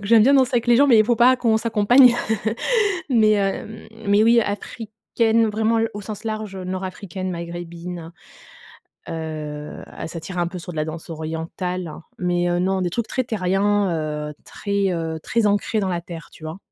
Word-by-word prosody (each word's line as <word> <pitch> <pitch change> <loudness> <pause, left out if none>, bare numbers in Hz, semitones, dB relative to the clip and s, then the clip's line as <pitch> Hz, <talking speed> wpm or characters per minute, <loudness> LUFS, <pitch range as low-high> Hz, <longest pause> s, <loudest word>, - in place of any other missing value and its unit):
Donc 205 - -10
j'aime 225 +1 +6
bien 275 +5 +5
danser 260 -1 +3
avec 235 0 +1
les 240 -1 +5
gens, 285 - +6
mais 235 -5 +6
il 215 - +6
faut 240 +1 +2
pas 250 +3 +6
qu'on 230 -3 +2
s'accompagne. 235 +3 +5 1.0
Mais 215 -3 +4
heu, - - +2
hem, 195 +2 -4 0.2
mais 205 +1 +4
oui, 235 +1 +5
africaine, 220 +2 -1
vraiment 220 +2 +1
l 225 0 0
au 205 - -5
sens 210 +1 -7
large, 215 -3 -4
heu, 185 - -6
nord 185 +1 -3
africaine, 185 0 -5
maghrébine, 170 0 -6 1.0
heu, 155 -2 -6 0.2
et - - -3
ça 165 0 -6
tire 180 +2 -7
un 175 - +1
peu 180 +1 -6
sur 175 +1 -8
de 160 - -10
la 155 - 0
danse 160 +1 -7
orientale, 165 +3 -4
heu. 155 - -9 0.2
Mais, 175 -1 0
heu, 175 - +1
non, 190 +1 +1
des 180 -1 -1
trucs 235 +4 -2
très 255 - -1
terriens, 200 -1 +1 0.4
heu, - - -7
très, 200 -2 -1
heu, 165 -1 -3
très 230 -2 +1
ancrés 205 +2 +1
dans 195 - -1
la 175 -2 -1
terre, 170 -1 -9
tu 160 - -13
vois? 160 +3 -6
195 Hz, 205 wpm, -22 LUFS, 175-220 Hz, 1.0 s, j'aime